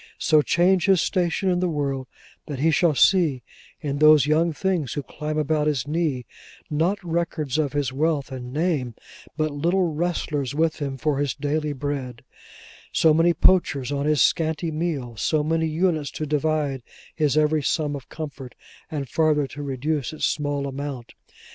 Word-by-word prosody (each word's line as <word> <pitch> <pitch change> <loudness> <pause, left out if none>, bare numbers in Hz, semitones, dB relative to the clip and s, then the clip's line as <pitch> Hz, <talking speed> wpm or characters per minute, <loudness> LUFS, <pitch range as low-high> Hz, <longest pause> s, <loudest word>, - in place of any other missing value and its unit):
So 155 -3 +4
change 175 +4 +2
his 190 -2 +5
station 180 +2 0
in 175 - +1
the 180 0 0
world, 140 -4 -2 0.4
that 145 - -5
he 160 +5 +2
shall 160 0 +3
see 150 - +3 0.4
in 140 -2 -3
those 155 -1 +7
young 160 +3 +2
things 165 -4 -1
who 145 - -3
climb 150 +2 -5
about 150 0 +1
his 145 -3 0
knee: 150 -5 -1 0.5
not 165 +7 +1
records 160 -4 -2
of 145 -3 0
his 140 -3 -1
wealth 150 -1 0
and 125 -1 -7
name: 145 -6 -1 0.4
but 155 -1 0
little 170 +6 +1
wrestlers 150 -5 -2
with 160 +1 +1
him 135 -2 -3
for 145 0 0
his 145 -3 -1
daily 150 +1 -1
bread; 135 -4 -4 0.7
so 160 -1 +4
many 165 +2 +4
poachers 145 -7 +2
on 140 +1 -1
his 150 -1 +4
scanty 160 0 0
meal; 150 -8 -3
so 150 +7 +1
many 160 +1 0
units 160 -2 0
to 155 - -5
divide 150 -2 0 0.3
his 150 -3 +1
every 155 0 +3
sum 145 0 0
of 135 -3 -9
comfort, 140 -5 -8 0.3
and 145 -4 -4
farther 150 +1 +2
to 145 +2 -8
reduce 140 0 -2
its 155 - -1
small 145 -1 -1
amount. 135 -3 -6
150 Hz, 165 wpm, -24 LUFS, 140-160 Hz, 0.7 s, those